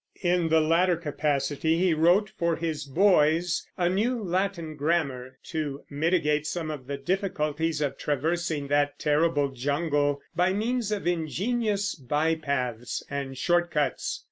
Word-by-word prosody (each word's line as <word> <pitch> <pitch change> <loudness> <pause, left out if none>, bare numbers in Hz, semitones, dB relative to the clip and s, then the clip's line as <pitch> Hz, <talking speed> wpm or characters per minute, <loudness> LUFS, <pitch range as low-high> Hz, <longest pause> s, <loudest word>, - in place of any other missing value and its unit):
In 175 -2 +2
the 160 0 +4
latter 170 +3 +3
capacity 150 0 0
he 180 -1 +3
wrote 175 +6 +3
for 170 -1 +1
his 160 -3 -3
boys 165 +1 +3
a 175 -2 +2
new 220 +7 +1
Latin 180 -3 -2
grammar, 140 -5 -1
to 150 -4 -4
mitigate 150 0 +1
some 160 -2 -3
of 135 -4 -7
the 140 0 -3
difficulties 160 -2 -1
of 145 -2 -2
traversing 155 0 -1
that 145 0 +1
terrible 150 -1 +2
jungle 145 +2 0 0.2
by 180 +2 +2
means 225 +1 -1
of 205 -4 -2
ingenious 200 +5 0
bypaths 140 -5 -1
and 135 -2 -4
short 175 +4 +2
cuts. 150 -3 -1
160 Hz, 135 wpm, -27 LUFS, 145-175 Hz, 0.2 s, the